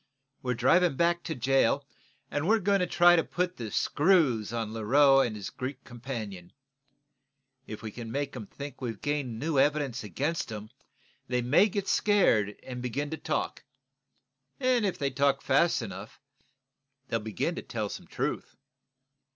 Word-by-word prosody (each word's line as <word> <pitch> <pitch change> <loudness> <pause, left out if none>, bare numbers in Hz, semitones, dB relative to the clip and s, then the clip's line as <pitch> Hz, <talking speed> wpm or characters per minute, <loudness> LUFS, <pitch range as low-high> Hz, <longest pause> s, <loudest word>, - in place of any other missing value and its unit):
We're 125 -1 -1
driving 165 +7 +3
back 170 +3 +2
to 160 - -3
jail, 135 +2 +2 0.5
and 145 +3 -1
we're 225 +2 +5
going 200 -1 +2
to 180 - +1
try 175 0 +6
to 165 - +3
put 180 +1 -2
the 115 -3 -5
screws 145 - +2
on 115 -2 -3
Leroux 135 +5 +5
and 120 -5 +1
his 100 -2 -6
Greek 130 0 -6
companion. 115 -8 -7 1.1
If 110 - -8
we 110 - -5
can 115 0 -7
make 140 +1 -3
'em 110 -5 -7
think 140 -2 -9
we've 115 -5 -4
gained 145 -6 -2
new 145 +3 0
evidence 140 -4 +1
against 135 - -2
'em, 110 +1 -7 0.6
they 125 -1 0
may 155 - +4
get 200 0 -3
scared 115 - +3
and 125 -1 -6
begin 140 +4 -3
to 160 - -3
talk. 155 -1 -3 1.0
If 245 -7 +1
they 140 -1 -1
talk 135 +1 +1
fast 170 -7 +3
enough, 100 0 -8 0.9
they'll 115 - 0
begin 105 -3 -2
to - - -5
tell - - -4
some - - -8
truth." - - -3
135 Hz, 160 wpm, -29 LUFS, 115-160 Hz, 1.1 s, try